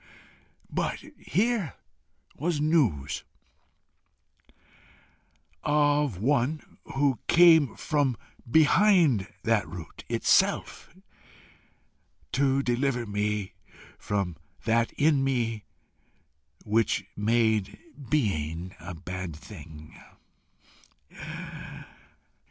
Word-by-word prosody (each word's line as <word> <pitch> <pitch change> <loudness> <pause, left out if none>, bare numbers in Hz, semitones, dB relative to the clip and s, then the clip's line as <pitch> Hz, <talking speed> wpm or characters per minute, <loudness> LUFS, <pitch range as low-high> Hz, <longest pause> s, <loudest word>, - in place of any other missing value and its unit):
But - - -1 0.2
here 210 - 0 0.6
was 160 +1 -1
news 110 - +1 2.4
of 145 -6 +2
one 140 - -1 0.2
who 135 -3 +2
came 165 -6 +6
from 145 -6 0 0.3
behind 160 - +4
that 115 -3 +1
root 80 -1 -9
itself - - +1 1.4
to 135 0 +2
deliver 125 0 0
me 105 -2 -2 0.5
from 95 -5 -2 0.3
that 115 +1 +2
in 145 -2 +3
me 115 -5 -1 1.0
which 105 -2 +1
made 110 -1 +1 0.3
being 90 - -1
a 90 - -8
bad 90 -1 -6
thing! 75 0 -12
120 Hz, 70 wpm, -27 LUFS, 100-145 Hz, 2.4 s, came